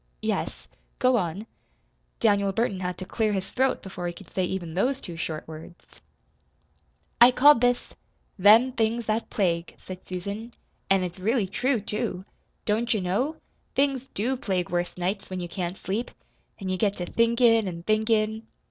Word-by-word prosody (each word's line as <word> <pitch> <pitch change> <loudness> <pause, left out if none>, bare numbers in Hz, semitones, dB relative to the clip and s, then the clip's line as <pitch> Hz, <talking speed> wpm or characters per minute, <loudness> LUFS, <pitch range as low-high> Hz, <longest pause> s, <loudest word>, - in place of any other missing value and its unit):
"Yes, - - -2 0.3
go 255 0 +3
on." 185 +2 -2 0.7
Daniel 200 -3 +3
Burton 200 -2 0
had 180 -1 -3
to 185 - -6
clear 215 +2 0
his 190 -1 -3
throat 265 +1 +1
before 180 -2 -5
he 175 - -3
could - - -14
say 185 - 0
even 180 -3 -3
those 255 +9 +1
two 175 -10 -7
short 160 -1 -4
words. 160 +2 -11 1.4
"I 240 - +11
called 275 +1 +6
this 245 0 +1 0.5
'Them 220 +7 +7
Things 230 -1 0
That 220 +2 -1
Plague,'" 170 -4 -1
said 185 -1 -9
Susan. 200 +6 -5 0.3
"An' 195 -1 +4
it's 180 0 -5
really 220 +3 +1
true, 245 +6 0
too. 195 -3 -3 0.4
Don't 225 +2 +1
you 210 - 0
know? 210 - 0 0.4
Things 270 -2 +1
DO 250 +6 0
plague 185 -7 -2
worse 175 0 -1
nights, 190 +3 -2
when 185 -1 -4
you 175 - -4
can't 180 +1 -4
sleep. 210 +6 -3 0.5
An' 190 -2 -4
you 185 - 0
get 200 +1 +1
to 175 - -3
thinkin' 230 0 +3
an' 170 -2 -5
thinkin'. 220 +1 +1
205 Hz, 165 wpm, -26 LUFS, 180-230 Hz, 1.4 s, I